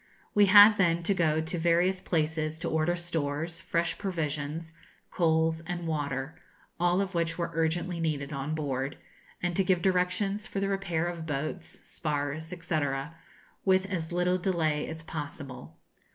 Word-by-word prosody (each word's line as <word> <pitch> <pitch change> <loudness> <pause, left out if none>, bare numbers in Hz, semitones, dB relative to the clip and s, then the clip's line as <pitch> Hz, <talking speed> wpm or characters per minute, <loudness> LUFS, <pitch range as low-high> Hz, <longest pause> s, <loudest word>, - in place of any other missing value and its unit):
We 205 -1 +6
had 205 +2 +9
then 170 -2 +3
to 200 - +2
go 160 -4 +2
to 165 +3 -2
various 175 +3 +2
places 155 -1 -1
to 170 +1 -4
order 160 +2 +2
stores, 165 -1 -3
fresh 170 -2 -1
provisions, 160 -3 -3 0.4
coals, 160 -1 +2
and 175 -1 -3
water, 145 0 -3 0.4
all 175 +2 +3
of 195 -1 -3
which 170 -1 0
were 170 -1 -2
urgently 170 +2 0
needed 150 -3 -2
on 140 +2 -2
board, 135 -3 -2 0.5
and 175 -1 0
to 195 - +3
give 180 -2 +2
directions 195 +3 +1
for 195 - -3
the 195 0 0
repair 185 -4 -1
of 170 -2 -4
boats, 155 +4 -3
spars, 150 0 -2
&c., 170 -2 -2 0.8
with 190 -1 +3
as 165 -3 -3
little 180 +1 +1
delay 160 -5 0
as 160 0 -6
possible. 140 - -7
165 Hz, 150 wpm, -29 LUFS, 155-180 Hz, 0.8 s, had